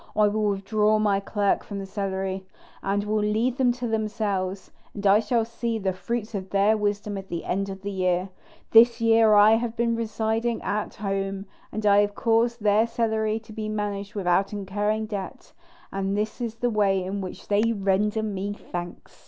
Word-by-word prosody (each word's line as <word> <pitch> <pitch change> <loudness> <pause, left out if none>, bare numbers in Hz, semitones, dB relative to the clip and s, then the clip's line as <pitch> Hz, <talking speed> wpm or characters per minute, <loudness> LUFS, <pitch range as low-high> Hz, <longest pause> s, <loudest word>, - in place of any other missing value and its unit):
I 210 -1 +4
will 210 0 0
withdraw 210 +2 +1
my 205 -2 +2
clerk 200 0 0
from 200 - -7
the 195 - -5
cellary, 190 -1 -3 0.4
and 200 +1 0
will 215 +1 0
leave 220 +5 0
them 255 -3 +3
to 245 0 -4
themselves; 205 -4 -2 0.2
and 205 -1 -6
I 200 +1 +6
shall 225 +1 +1
see 230 0 -3
the 190 -3 -1
fruits 230 +3 -4
of 190 -2 -4
their 200 +3 +3
wisdom 205 -1 -2
at 195 - -10
the 170 -2 -5
end 195 +2 -1
of 195 0 -8
the 200 - -3
year. 185 -1 0 0.4
This 230 +1 +7
year 225 -1 +5
I 210 +2 +7
have 235 0 -3
been 235 0 +1
residing 225 +1 -1
at 210 +1 -2
home, 195 -1 -3 0.3
and 215 0 -4
I 205 0 +6
have 205 0 -1
caused 230 0 +1
their 215 +2 +4
cellary 220 -2 0
to 220 0 -13
be 215 -1 -4
managed 205 -1 -3
without 190 0 +1
incurring 210 +2 -1
debt; 210 +4 -7 0.4
and 195 +1 -1
this 215 +3 -2
is 230 -2 -3
the 240 +1 -1
way 195 -3 +2
in 195 +2 -3
which 185 0 -8
they 205 0 +3
render 210 +1 +1
me 205 -1 -3
thanks." 175 -3 -8
210 Hz, 185 wpm, -25 LUFS, 195-220 Hz, 0.4 s, This